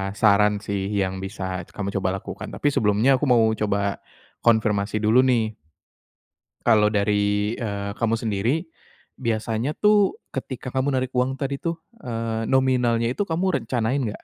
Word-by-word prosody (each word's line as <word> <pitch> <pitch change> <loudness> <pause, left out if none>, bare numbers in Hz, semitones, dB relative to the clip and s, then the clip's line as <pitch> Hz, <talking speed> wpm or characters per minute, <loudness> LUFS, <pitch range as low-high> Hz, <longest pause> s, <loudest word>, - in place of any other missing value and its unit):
saran 105 -1 +4
sih 100 -1 -2
yang 95 -2 -1
bisa 95 -1 -4
kamu 100 -1 -4
coba 95 - 0
lakukan. - - -7
Tapi 145 - -1
sebelumnya 115 +2 +3
aku - - 0
mau 120 -2 +5
coba 100 -1 -1 0.4
konfirmasi 110 -2 +2
dulu 110 +4 +4
nih. 125 -3 +3 1.2
Kalau 105 -2 +5
dari, 105 +1 +1
eee, 100 -3 -3
kamu 115 -1 +1
sendiri, 115 - -1 0.6
biasanya 115 +3 -1
tuh 210 -2 +3
ketika 130 -1 -5
kamu 135 +1 0
narik 130 0 -1
uang 130 +2 +1
tadi 140 0 -2
tuh, 170 0 -2 0.2
eee, 115 -1 -3
nominalnya 125 -3 +2
itu 205 - -1
kamu 170 0 0
rencanain 120 +3 0
enggak? 110 -3 -5
115 Hz, 145 wpm, -23 LUFS, 105-130 Hz, 1.2 s, mau